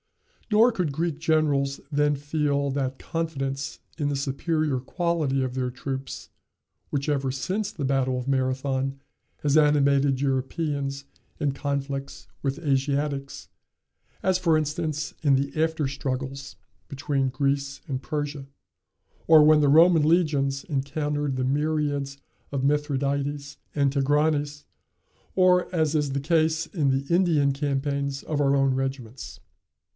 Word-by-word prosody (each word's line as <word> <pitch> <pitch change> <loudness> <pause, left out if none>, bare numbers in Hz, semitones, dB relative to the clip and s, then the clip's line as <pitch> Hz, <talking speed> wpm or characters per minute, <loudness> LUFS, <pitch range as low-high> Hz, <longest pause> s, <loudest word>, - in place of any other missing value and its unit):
Nor 225 +3 +5
could 180 -8 -1
Greek 160 +1 -2
generals 150 -4 +1
then 145 0 +2
feel 145 -1 -1
that 135 -1 -2
confidence 140 -5 -3 0.2
in 145 -1 0
the 145 - -1
superior 145 +1 -1
quality 155 -2 -1
of 130 -1 -3
their 130 -1 -1
troops, 135 +1 -6 0.6
which 140 0 -2
ever 140 -3 0
since 190 +11 -2
the 155 -10 -4
battle 130 -1 +1
of 125 +1 -5
Marathon 135 0 -1 0.4
has 145 -1 +2
animated 140 -3 +4
Europeans 140 +1 -2 0.3
in 145 - +1
conflicts 140 0 -4
with 140 +2 -2
Asiatics, 140 -1 -1 0.8
as, 190 -1 +2
for 165 -4 +3
instance, 155 0 -2
in 140 -3 +4
the 140 +1 -1
after 160 -3 0
struggles 135 0 -4 0.3
between 140 -1 -1
Greece 140 +1 -1
and 130 -2 -3
Persia, 145 -1 -4 0.8
or 160 -2 +8
when 155 0 +6
the 145 - +4
Roman 165 +2 +6
legions 145 -4 +2
encountered 145 0 -2
the 130 0 -1
myriads 145 -1 -1 0.3
of 135 -2 -2
Mithradates 140 0 -1 0.2
and 140 -2 +2
Tigranes, 145 +1 +1 0.7
or 180 -1 +3
as 160 -3 +1
is 150 -3 +1
the 140 - -1
case 160 +1 +1
in 150 -7 0
the 135 +1 0
Indian 160 -6 +3
campaigns 140 0 -2
of 150 -2 -2
our 140 -1 +3
own 135 -1 +3
regiments. 130 -2 -4
140 Hz, 130 wpm, -25 LUFS, 135-155 Hz, 0.8 s, or